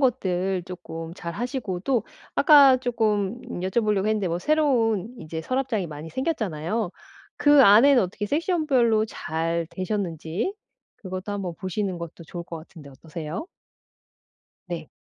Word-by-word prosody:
것들 190 -8 0
쪼끔 165 -2 -7
잘 170 -2 -6
하시고 230 - -3
또 235 +1 0 0.3
아까 285 -5 +7
쪼끔 220 -3 0 0.2
여쭤보려고 205 +1 +1
했는데 215 -2 +1
뭐 170 - -1
새로운 245 - +2
인제 160 -2 -5
서랍장이 255 -1 -1
많이 155 +1 -8
생겼잖아요. 215 - -2 0.5
그 290 -1 +6
안에는 245 +5 +7
어떻게 195 +3 -3
섹션 320 - 0
별로 235 -6 +3
잘 165 -3 -2
되셨는지 185 - -2 0.4
그것도 185 0 -6
한번 190 -4 -3
보시는 190 0 -2
것도 170 0 -8
좋을 170 +2 -7
것 170 - -7
같은데 155 -2 -13
어떠세요? 155 - -6 1.2
네. 165 -3 -5
200 Hz, 300 characters per minute, -25 LUFS, 170-245 Hz, 1.2 s, 아까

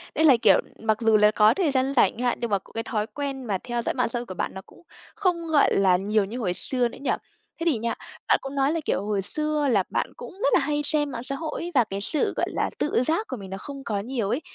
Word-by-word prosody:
nên 315 - +3
là, 270 -6 +7
kiểu, - - +6 0.2
mặc 220 -1 +1
dù 225 -1 +5
là 210 0 +5
có 215 +1 +5
thời 320 0 +1
gian 265 0 +1
rảnh 245 - +4
ch - - -5
hạn, 245 -1 +1
nhưng 235 - -1
mà 200 - +2
c - - -34
cái 225 - -3
thói 215 -2 -2
quen 275 0 -4
mà 200 -4 0
theo 240 -1 -2
dõi - - -1
mạng 250 -3 0
xã 240 - -2
hội 240 - -6
của 185 - -7
bạn - - -3
nó 190 - -7
cũng - - -19 0.3
không, 360 -6 0
gọi 305 -3 +4
là, 190 -2 +4
nhiều 205 +2 +1
như 225 +6 -6
hồi 185 -7 0
xưa 250 +5 0
nữa - - -11
nhỉ? 280 - 0 0.5
Thế 330 - -3
thì 315 -8 +3
nha, 230 +1 -1 0.3
bạn - - +5
cũng 270 +1 -6
nói 275 +1 +2
là, 335 - 0
kiểu, 195 - 0
hồi 205 -2 0
xưa 300 +6 -1
là 210 -7 +3
bạn - - -2
cũng - - -8
rất - - +3
là - - +6
hay 295 -1 0
xem 295 -1 0
mạng 235 - -5
xã 275 +2 -3
hội 315 +2 -4
ấy 345 - -4
và 250 - +6
cái 200 -2 -5
sự, 295 +9 0
gọi - - +2
là, - - -1
tự 275 -4 +1
giác 330 - 0
của 260 - -5
mình 195 -2 -9
nó 195 - -5
không 275 +6 -8
có 205 -5 -2
nhiều 230 -2 -2
ấy, 245 +8 0
245 Hz, 295 wpm, -25 LUFS, 215-290 Hz, 0.5 s, là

